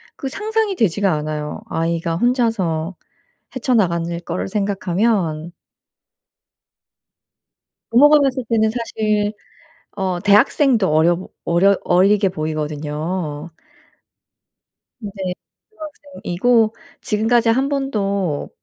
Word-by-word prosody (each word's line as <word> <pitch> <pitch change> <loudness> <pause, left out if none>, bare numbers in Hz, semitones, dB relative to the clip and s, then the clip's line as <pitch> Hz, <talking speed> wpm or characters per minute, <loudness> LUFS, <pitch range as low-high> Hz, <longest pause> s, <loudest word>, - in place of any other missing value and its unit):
그 270 - -5
상상이 430 +4 -1
되지가 200 - +1
않아요. 150 0 -4
아이가 165 0 -1
혼자서 190 -7 0 0.6
헤쳐나가는 170 -9 0
거를 - - -4
생각하면 195 -4 -1 2.4
부모가 295 +5 +6
봤을 265 -2 0
때는 220 -1 +2
사실 215 -3 -1 0.6
어 190 -3 -2
대학생도 215 +2 +3
어려 165 +3 +4
보 185 - -9 0.2
어려 190 +4 +4
어리게 195 +2 +3
보이거든요. 155 0 -4 1.5
네 205 -3 -7 0.6
고등학생이고 245 - -1 0.3
지금까지 230 +2 +2
1 265 +4 +2
번도 200 - -2
200 Hz, 215 characters per minute, -19 LUFS, 170-235 Hz, 2.4 s, 부모가